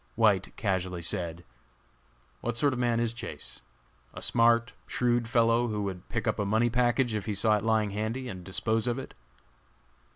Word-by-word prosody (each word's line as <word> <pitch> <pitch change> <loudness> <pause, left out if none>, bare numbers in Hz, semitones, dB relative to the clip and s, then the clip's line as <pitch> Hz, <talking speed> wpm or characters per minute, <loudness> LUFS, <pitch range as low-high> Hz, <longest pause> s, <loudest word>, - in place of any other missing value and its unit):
White 105 -4 +2
casually 95 -4 -1
said: 85 0 -2 1.0
"What 120 -1 -3
sort 140 +2 +3
of 125 - -3
a - - 0
man 120 -1 +2
is 120 -1 0
Chase? 115 - -7 0.5
A - - -7
smart, 115 -1 +3
shrewd 120 -1 +1
fellow 115 0 +3
who 105 -2 -2
would 95 -2 -5
pick 115 -2 -2
up - - 0
a - - +2
money 110 +4 +2
package 120 0 +2
if 105 -3 -3
he 105 - -1
saw 110 +2 +3
it 105 - -1
lying 110 -2 +2
handy, 110 +5 -3
and 95 -6 -7
dispose 110 +5 -1
of 120 +1 0
it?" 135 - -7
115 Hz, 185 wpm, -29 LUFS, 100-120 Hz, 1.0 s, sort